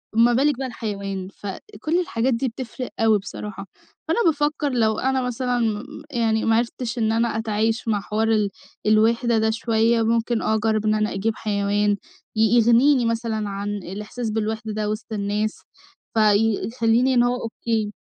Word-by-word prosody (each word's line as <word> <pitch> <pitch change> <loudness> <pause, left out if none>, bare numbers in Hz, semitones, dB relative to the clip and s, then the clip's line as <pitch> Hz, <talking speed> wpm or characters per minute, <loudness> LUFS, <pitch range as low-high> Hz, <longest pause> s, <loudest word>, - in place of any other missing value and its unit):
ما 235 +2 +5
بالِك 275 +2 +2
بقى 265 0 -3
الحيوان. 200 -5 -4
فكل 310 - -4
الحاجات 260 -7 0
دي 235 +3 0
بتفرق 250 +1 -6
أوي 220 -2 +4
بصراحة. 195 0 -7 0.4
فأنا 325 - +1
بافكّر 295 -2 +1
لو 220 -4 +1
أنا 265 0 +1
مثلًا 250 0 -1 0.5
يعني 225 -3 +1
ما 225 - +3
عرفتش 235 +1 -2
إن 220 -2 +1
أنا 230 0 +1
أتعايش 225 +1 -1
مع 210 -3 +1
حوار 215 +2 -1
ال 210 -2 +2 0.4
الوِحدة 230 +2 +3
ده 220 0 +2
شوية 225 +1 +2
ممكن 230 +1 +1
أجرّب 220 0 +1
إن 215 0 +3
أنا 215 0 0
أجيب 215 +3 -1
حيوان 205 0 +1 0.4
ي 220 - +1 0.2
يغنيني 240 +3 +5
مثلًا 225 -2 -1
عن 200 +1 -4
الإحساس 210 +5 -5
بالوِحدة 220 0 -2
ده 210 0 -2
وِسط 215 +1 -5
الناس، 210 +1 -2 0.6
فيخلّيني 225 +3 +3
إن 240 -1 +4
هو 245 +1 0
أوكي. 225 -2 -2
225 Hz, 155 wpm, -23 LUFS, 215-240 Hz, 0.6 s, ما